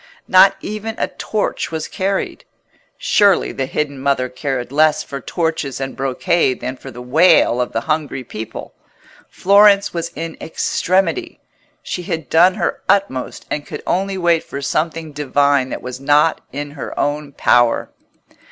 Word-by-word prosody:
Not 185 +1 +6
even 215 +2 -5
a - - -1
torch 215 -1 -2
was 160 -1 -4
carried. 195 0 -2 0.5
Surely 205 - +3
the 135 -1 -3
hidden 145 -1 -3
Mother 135 -2 0
cared 125 -1 -4
less 155 +1 +3
for 140 -1 -7
torches 160 -6 -2
and 135 -1 -4
brocade 135 +1 0
than 130 +1 -4
for - - -11
the 125 +1 -9
wail 150 -2 +4
of 125 - -2
the - - -1
hungry 155 -4 -2
people. 110 -2 -8 0.6
Florence 200 +1 +4
was 170 -1 -3
in 165 +1 -5
extremity: 195 - -1 0.4
she 180 - -4
had 165 -3 -5
done 180 +3 +5
her - - -2
utmost, 190 -10 0
and 145 - -3
could - - -7
only 195 +1 -1
wait 170 -2 +2
for 140 - -7
something 160 +3 -2
divine 140 -2 +1
that - - -6
was 125 0 -6
not 150 +3 +3
in 145 +1 -5
her 145 - -7
own 145 0 -1
power. 120 -2 +2
150 Hz, 150 wpm, -18 LUFS, 135-180 Hz, 0.6 s, Not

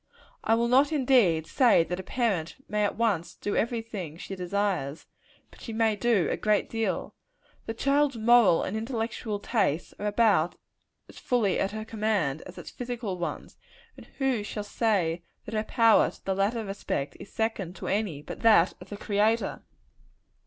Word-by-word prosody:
I 225 - +3
will 235 +1 +1
not, 270 +5 +4
indeed, 245 - +3
say 230 - +4
that 180 +2 -4
a - - -2
parent 190 -5 -1
may 210 0 0
at 205 - 0
once 210 -8 0
do 205 - -3
every 230 0 0
thing 180 -9 -7
she 195 - -7
desires; 180 -5 -2 0.5
but - - -17
she 230 - -6
may 220 -1 +2
do 205 -6 +2
a - - -1
great 210 -1 +1
deal. 225 -1 -2 0.5
The 225 - -3
child's 280 +1 +2
moral 225 -5 +5
and 190 - -3
intellectual 225 -1 -3
tastes 200 - -1
are 210 - -2
about 205 -6 +3 0.5
as - - -13
fully 225 -7 +1
at 195 - +1
her 215 +1 -6
command, 210 -10 -1
as 185 - -12
its - - -9
physical 235 -6 -5
ones; 175 - -5 0.4
and - - -14
who 265 -5 +1
shall 210 0 -5
say 195 -6 0 0.2
that 215 - -8
her 215 0 0
power 230 -1 +4
to - - -17
the 195 - 0
latter 210 +4 0
respect, 195 -8 -3
is - - -11
second 215 -5 -2
to - - -8
any 195 -8 -1
but - - -8
that 215 -6 +5
of - - -12
the 205 - -6
Creator? 215 +3 0
210 Hz, 175 wpm, -27 LUFS, 185-230 Hz, 0.5 s, moral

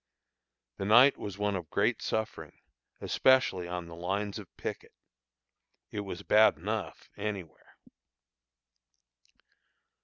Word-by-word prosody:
The 95 - -3
night 120 +7 +7
was 100 -2 -7
one 105 -1 0
of 85 -5 -5
great - - +1
suffering, 105 -8 -4 0.4
especially 130 -9 +3
on 90 0 -4
the 85 - -11
lines 100 +5 -3
of 100 - -10
picket - - -6 1.0
it 105 - -4
was 100 -1 -6
bad 110 +2 +5
enough - - -4
anywhere. 100 -8 -6
100 Hz, 110 wpm, -30 LUFS, 90-105 Hz, 1.0 s, night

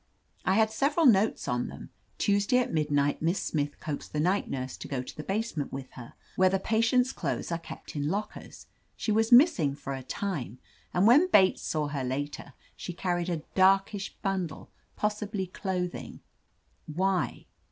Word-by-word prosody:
I 190 - +3
had 220 0 +3
several 290 +7 +2
notes 220 -4 +4
on 125 0 0
them: - - -10 0.3
Tuesday 205 +4 +2
at 250 - 0
midnight 145 -2 +1
Miss 170 +4 +1
Smith 145 -2 -2
coaxed 150 -2 -6
the 150 - -1
night 185 +6 +1
nurse 130 -1 -4
to - - -8
go 130 -3 -3
to - - -10
the - - -5
base 215 +7 -2
ment 145 -3 -3
with 135 -1 -7
her, 120 -2 -11 0.2
where 185 0 +4
the 195 - +1
patients' 230 +5 +2
clothes - - -3
are 170 - -1
kept 165 - -10
in 145 0 -1
lockers: 205 +4 -5 0.3
she 220 - -1
was 220 +2 +2
missing 240 - +6
for 140 -1 -6
a 135 - -5
time, 135 - -4 0.3
and 180 +2 +2
when 290 +11 +6
Bates 190 - +5
saw 155 -2 -1
her 140 -2 -3
later 140 +1 -4 0.2
she 175 - -6
carried 175 0 -1
a 165 -3 -2
'darkish 195 +1 +2
bundle,' 190 -4 -3 0.2
possibly 210 -2 -2
clothing. 180 -1 -4 0.7
.Why?" 185 +4 -1
185 Hz, 175 wpm, -28 LUFS, 150-210 Hz, 0.7 s, missing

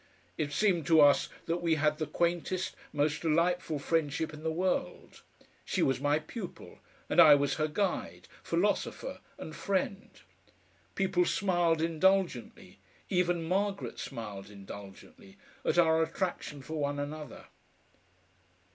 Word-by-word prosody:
It 145 +6 -2
seemed 175 -3 +1
to 160 -1 +6
us 145 -1 +5 0.2
that 170 +1 -1
we 165 -2 +2
had 150 0 +1
the 155 - -1
quaintest, 175 +2 -1 0.2
most 150 +1 0
delightful 165 0 +1
friendship 155 +1 -1
in 150 - -9
the 160 - -1
world; 180 +3 -2 0.4
she - - 0
was 135 -1 +1
my 145 +1 +3
pupil, 180 +5 -8 0.3
and - - +6
I 150 -2 +9
was 145 0 0
her 155 - +2
guide, 190 +5 -2
philosopher, - - -1 0.2
and 155 - -8
friend. 195 0 -2 0.9
People 185 -2 +2
smiled 175 -5 +1
indulgently 170 - 0 0.3
even 175 -2 +1
Margaret 185 - -1
smiled 100 -3 -6
indulgently 105 - -12 0.3
at - - 0
our 160 -1 +5
attraction 160 -4 -3
for 155 +3 -5
one 145 0 -1
another. 145 -1 -6
160 Hz, 130 wpm, -31 LUFS, 145-180 Hz, 0.9 s, I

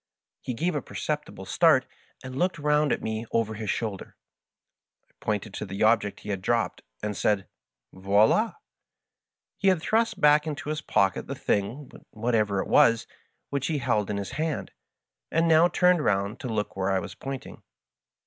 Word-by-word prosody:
He 125 - -4
gave 175 +9 0
a 145 - -1
perceptible - - -4
start, - - +4 0.4
and 130 0 -7
looked 180 -1 +1
round 150 0 +2
at - - -1
me 110 +1 -3
over 115 -1 0
his 110 -1 -5
shoulder. 105 -3 -3 0.9
I - - -34
pointed 105 -1 -2
to 105 - -4
the 95 +2 -2
object 110 -2 +2
he - - -9
had 100 -2 -2
dropped, 110 -2 0 0.2
and 105 -1 -2
said, 105 -1 +1 0.2
" - - -55
Voild! 105 - +3 0.5
" - - -64
He 195 - +1
had 185 -3 +4
thrust 225 +6 +1
back 150 +1 +5
into 150 -1 -4
his 155 0 -2
pocket 95 -7 +1
the - - -4
thing, 115 +8 -2 0.2
whatever 110 -3 0
it - - -9
was, 115 -1 +4 0.5
which 140 -1 -1
he 160 - 0
held 105 -6 0
in 105 - -1
his 100 -1 -4
hand, 155 -1 -3 0.6
and 165 +1 +2
now 165 +1 +6
turned 180 -2 +3
round 100 +1 0
to - - -5
look 105 -2 -2
where 95 0 -1
I 95 - +2
was 95 - -5
pointing. 135 -1 -7
115 Hz, 175 wpm, -26 LUFS, 105-150 Hz, 0.9 s, now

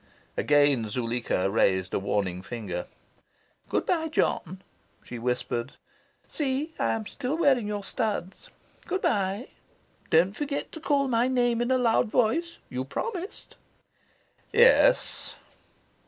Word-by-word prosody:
Again 145 -6 +3
Zuleika 115 -4 -1
raised 95 -2 +1
a - - +1
warning 95 -2 -1
finger. 95 -5 -5 0.8
"Good - - 0
bye, 325 -3 +1
John," 190 - -1 0.4
she 120 - -7
whispered. 125 +1 -2 0.5
"See, 295 +2 -2
I - - +1
am 220 -1 -3
still 275 +6 -3
wearing 270 -9 +3
your 205 -1 -3
studs. 200 -4 -3 0.4
Good 380 - -2
bye. 200 +3 0 0.6
Don't 180 +5 +4
forget 285 +1 -3
to 320 - -8
call 285 -3 +1
my 240 0 +2
name 245 -2 +1
in 240 - 0
a 260 - +4
loud 235 -1 +3
voice. 255 +10 +1
You 130 0 -3
promised." 375 - -5 0.9
"Yes." - - +4
215 Hz, 125 wpm, -27 LUFS, -, 0.9 s, Don't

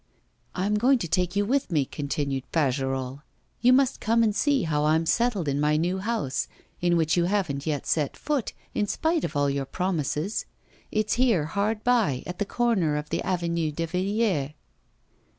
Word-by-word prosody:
'I'm 205 +3 0
going 260 +4 +4
to 175 - -4
take 180 +2 0
you 205 0 +2
with 270 +5 0
me,' 150 -5 +2
continued 140 -2 -3
Fagerolles; 135 -3 -1 0.4
you 245 - +5
must 260 0 +3
come 230 +1 +3
and 215 -2 +1
see 285 -1 +2
how 150 -2 0
I'm 160 +2 +3
settled 215 -2 +1
in 140 0 0
my 150 +1 +2
little 175 +4 0
house, 205 - -1 0.3
in 175 -1 +3
which 160 -1 +2
you 175 -1 +2
haven't 175 -7 -1
yet 145 -3 -1
set 150 -4 0
foot, 290 -6 -2 0.2
in 210 -2 0
spite 320 - 0
of 150 - -3
all 145 0 +2
your 140 -1 -1
promises. 175 - -2 0.4
It's 215 +1 0
there, 230 -12 +3
hard 210 +6 -1
by, 225 - +2
at 180 0 -6
the 205 - +1
corner 195 -10 +1
of 150 0 -5
the - - 0
Avenue 170 -3 -1
de 165 +3 -2
Villiers. 185 -4 0
175 Hz, 180 wpm, -26 LUFS, 150-215 Hz, 0.4 s, you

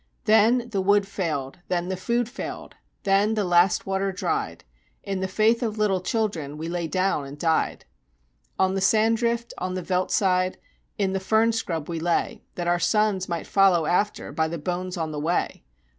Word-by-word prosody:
Then 225 +3 +4
the 195 -3 0
wood 205 +1 +3
failed 160 -8 -3
then 180 0 -1
the 190 - -1
food 235 +5 -1
failed 245 - -7 0.3
then 200 +3 +3
the 210 - +1
last 175 0 +3
water 195 0 -1
dried 415 - -3 0.4
In 195 -2 -3
the 190 - -1
faith 220 +5 +2
of 220 -3 -2
little 200 -3 +1
children 180 -9 -2
we 160 +2 -5
lay 170 -1 -2
down 185 -3 0
and 140 +2 -9
died. 160 +1 0 0.7
"On 190 0 +2
the 195 - -1
sand 220 +3 +3
drift 235 0 -1
on 185 0 -3
the 185 - -3
veldt 185 +1 0
side 185 -2 +1 0.4
in 195 -2 0
the 195 - 0
fern 220 +4 +3
scrub 165 -9 -3
we 165 -1 -3
lay, 170 +1 -1
That 175 - -3
our 175 0 +2
sons 210 -2 +1
might 170 -2 -3
follow 190 -5 +4
after 200 +6 0
by 160 0 0
the 170 +1 -4
bones 180 +3 -3
on 160 -2 -2
the 150 - -4
way. 165 +4 -1
190 Hz, 190 wpm, -25 LUFS, 175-215 Hz, 0.7 s, Then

